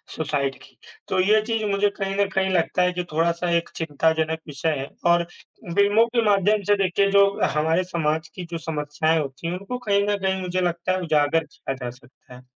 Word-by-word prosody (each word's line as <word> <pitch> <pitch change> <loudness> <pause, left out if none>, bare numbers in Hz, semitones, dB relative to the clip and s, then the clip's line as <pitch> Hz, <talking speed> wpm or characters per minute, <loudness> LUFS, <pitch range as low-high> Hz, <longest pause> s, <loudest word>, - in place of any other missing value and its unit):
Suicide 140 -3 -1
की, - - -18 0.3
तो 190 - 0
ये 210 +3 +4
चीज़ 225 0 -2
मुझे 200 +1 +2
कहीं 195 -1 -4
न 200 0 +2
कहीं 190 -1 0
लगता 180 +1 +1
है 180 - +2
कि 180 0 -2
थोड़ा-सा 170 +2 0
एक 170 - -3
चिंताजनक 160 +1 0
विषय 150 +2 -2
है 135 - -5 0.2
और 170 0 +4 0.5
फिल्मों 205 +3 +4
के 235 - +4
माध्यम 205 +1 +3
से 205 - +5
देखिए 195 +1 +2
जो 200 0 +6 0.3
हमारे 160 +4 +2
समाज 160 -3 -1
की 180 - -6
जो 170 - -2
समस्याएँ 155 0 -1
होती 135 +2 -5
हैं, 170 - -2
उनको 200 +7 -5
कहीं 205 -5 +1
न 205 - +1
कहीं 190 -1 -1
मुझे 185 0 -2
लगता 175 0 -1
है 185 0 0
उजागर 155 -1 +2
किया 150 -2 -6
जा 125 - -3
सकता 125 +1 -17
है। 125 +1 -15
175 Hz, 205 wpm, -23 LUFS, 155-195 Hz, 0.5 s, जो